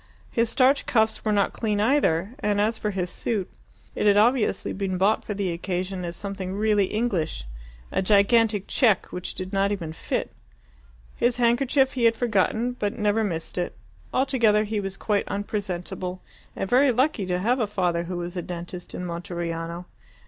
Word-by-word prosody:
His 230 -1 +1
starched 265 +4 +3
cuffs 220 -2 +2
were 215 - +1
not 200 -2 +2
clean 210 -3 -1
either, 210 - +2
and 210 -5 0
as 220 +2 +1
for 210 - -1
his 180 -3 -2
suit, 205 -3 -2 0.5
it - - +1
had 205 0 +5
obviously 225 -2 +2
been 190 -2 -2
bought 200 +4 +2
for 210 - -4
the 195 -3 -1
occasion 180 +2 -3
as 170 0 -4
something 195 -1 -5
really 210 -1 +3
English 190 - -1 0.5
a - - +1
gigantic 205 +1 +3
check, 225 -9 +3
which 180 0 -3
did 185 +2 -6
not 195 +1 +2
even 170 -6 -3
fit. - - -3 0.8
His 240 0 +1
handkerchief 260 +3 +3
he 245 -3 +1
had 230 0 +5
forgotten, 225 +1 +1
but 205 +1 -1
never 210 0 +2
missed 170 -3 -3
it. 175 - -3 0.4
Altogether, 235 -6 +3
he 215 0 -2
was 195 -1 -4
quite 205 -2 0
unpresentable, 185 -3 -4 0.3
and - - -2
very 260 +5 +5
lucky 250 -5 +1
to 180 -1 0
have 235 +8 +1
a 220 - +1
father 175 -4 0
who 180 +1 -4
was 175 +1 -5
a 180 - -2
dentist 175 +1 -7
in 180 - -4
Monteriano. 170 0 -4
205 Hz, 175 wpm, -25 LUFS, 180-225 Hz, 0.8 s, had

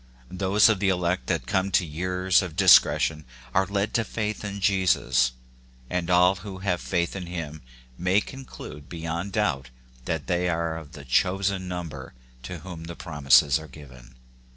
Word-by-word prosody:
Those 95 +3 +4
of 110 -4 +2
the 100 -1 +2
elect 90 0 0
that - - -1
come 95 +1 0
to 95 - +3
years 90 +4 +1
of 90 -4 -6
discretion 85 -4 +5 0.3
are 95 0 +2
led 100 +2 -1
to 115 - +2
faith 105 0 -4
in 100 -1 -5
Jesus; 85 -11 +2 0.6
and 90 -1 -1
all 90 +1 +4
who 95 0 -8
have 90 -3 0
faith 85 -1 -1
in 90 -2 -5
him 80 -3 -6 0.4
may 90 +3 +3
conclude 105 - -10
beyond 85 +3 -4
doubt 75 - 0 0.4
that 80 0 -2
they 90 0 0
are 85 -1 -1
of 80 -2 -9
the 70 -2 -10
chosen 95 +7 +1
number 80 -8 -6 0.3
to 80 +6 -7
whom 85 -2 -8
the 85 0 -7
prom 75 -5 -8
ises 70 +2 +6
are 80 - -10
given. 65 -4 -14
90 Hz, 170 wpm, -25 LUFS, 80-95 Hz, 0.6 s, ises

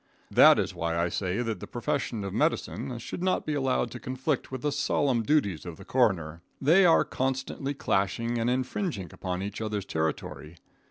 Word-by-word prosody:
That - - +8
is - - -1
why 85 0 -2
I 85 +1 +1
say 95 +6 -1
that 110 -5 -3
the - - -8
profession 120 -4 -2
of 100 - -4
medicine 125 - -1
should 120 - -6
not 185 0 +1
be 155 - -1
allowed 130 -4 0
to 125 - -7
conflict 130 +4 -2
with 130 0 -5
the 150 - +1
solemn 140 -3 +1
duties 110 - +1
of 85 -2 -8
the - - -12
coroner. 85 -11 +1 0.2
They 175 +7 +5
are 165 - +5
constantly 135 +1 -2
clashing 115 +2 0
and 115 +1 +1
infringing 130 - -2
upon 90 0 -3
each 100 +2 -5
other's 105 -3 -2
territory. 80 0 -3
120 Hz, 180 wpm, -28 LUFS, 95-135 Hz, 0.2 s, That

